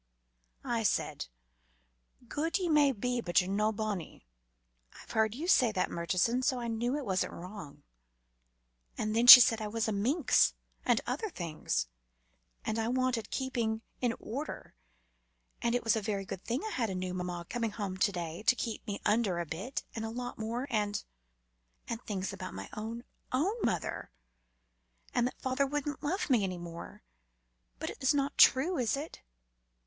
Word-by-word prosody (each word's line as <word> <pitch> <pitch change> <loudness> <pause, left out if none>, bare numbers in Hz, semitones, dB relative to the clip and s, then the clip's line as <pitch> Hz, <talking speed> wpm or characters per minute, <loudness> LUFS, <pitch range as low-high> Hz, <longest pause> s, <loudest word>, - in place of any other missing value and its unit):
"I 235 -1 0
said, 205 - 0 1.0
'Guid 315 - -1
ye 365 -3 -1
may 295 -3 +5
be, 245 +1 -2
but 175 -3 +3
ye're 180 - -1
no 210 +3 +1
bonny' 205 - -4 0.7
I've - - -12
heard 220 0 +1
you 315 +7 -4
say 255 - +5
that, 185 -2 0
Murchison, 185 +8 +1
so 255 -1 +1
I 235 - -4
know 235 +3 -1
it 290 -2 -3
wasn't 190 -3 -1
wrong, 180 -4 -9 1.1
and 215 0 -1
then 235 +2 +3
she 250 - +15
said 225 -2 +4
I 215 - -2
was 225 +2 -1
a - - 0
minx, 245 - +3 0.3
and - - +2
other 440 - -2
things, 165 - -2 0.8
and 220 +1 -1
I 225 - 0
wanted 250 -3 0
keeping 235 -4 -2 0.2
in 240 -2 0
order, 275 +8 -6 0.9
and 235 0 +1
it 245 - 0
was 225 +1 +3
a 220 - -1
very 200 -2 -2
good 190 - -7
thing 240 +5 -2
I 435 - -4
had 230 - -1
a 190 - -3
new 185 0 -3
mamma 180 -1 -4
coming 230 -2 -2
home 200 -3 -4
to 200 +2 +2
day, 170 -2 -5
to - - +6
keep 230 -1 -4
me 205 -1 -3
under 210 -4 +2
a 175 - -2
bit, 190 - -5
and 225 - -3
a 225 - -3
lot 245 +1 -6
more 230 +4 -2
and 210 -2 0 0.8
and 230 0 -4
things 195 -4 -4
about 185 -1 -7
my - - -7
own, 225 +2 -5 0.3
own 310 +11 +1
mother, 175 - -2 1.0
and 245 - +2
that - - -8
father 260 +2 0
wouldn't 295 +1 -3
love 345 +7 -1
me 245 -7 +3
any 185 -2 -2
more. 170 -1 -9 0.7
But - - -4
it's 265 +2 +1
not 280 0 0
true, 315 +6 +6
is 245 +2 +1
it? 300 +3 -7
225 Hz, 175 wpm, -31 LUFS, 195-255 Hz, 1.1 s, she